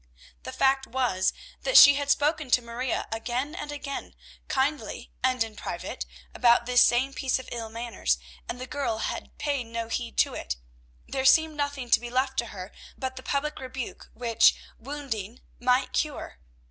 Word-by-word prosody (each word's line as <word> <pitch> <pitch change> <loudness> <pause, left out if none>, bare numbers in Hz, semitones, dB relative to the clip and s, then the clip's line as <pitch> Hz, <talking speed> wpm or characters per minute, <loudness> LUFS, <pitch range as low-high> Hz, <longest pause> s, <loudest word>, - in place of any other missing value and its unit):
The - - -7
fact 270 0 +2
was, 235 -7 +1 0.3
that - - +4
she 285 - +11
had 285 0 -2
spoken 295 0 +2
to 250 - +5
Maria 235 +2 -2
again 240 +6 -2
and 295 -3 -5
again, 280 -1 -6 0.3
kindly 280 +3 -1
and 255 -2 +3
in 220 -1 -9
private, - - -5 0.3
about 240 -1 +4
this 250 0 +5
same 260 +3 +4
piece 265 -2 0
of 260 - -9
ill 230 -2 -4
manners, 225 - -1 0.3
and 245 - -4
the 255 - -4
girl 260 -4 -2
had - - -4
paid 280 -4 -1
no 230 0 -4
heed 235 0 -3
to - - +3
it. - - -3 0.5
There 265 - -2
seemed 315 +3 +5
nothing 285 -4 -3
to - - +7
be 240 - -7
left 260 +2 0
to 235 - -1
her 190 -2 -8 0.3
but 260 -1 -4
the 260 - -7
public 290 +3 -2
rebuke, 260 -1 -6
which, 230 -2 +4 0.2
wounding, 245 -5 -5 0.2
might 250 +1 +2
cure. 290 - -2
255 Hz, 170 wpm, -27 LUFS, 235-280 Hz, 0.5 s, she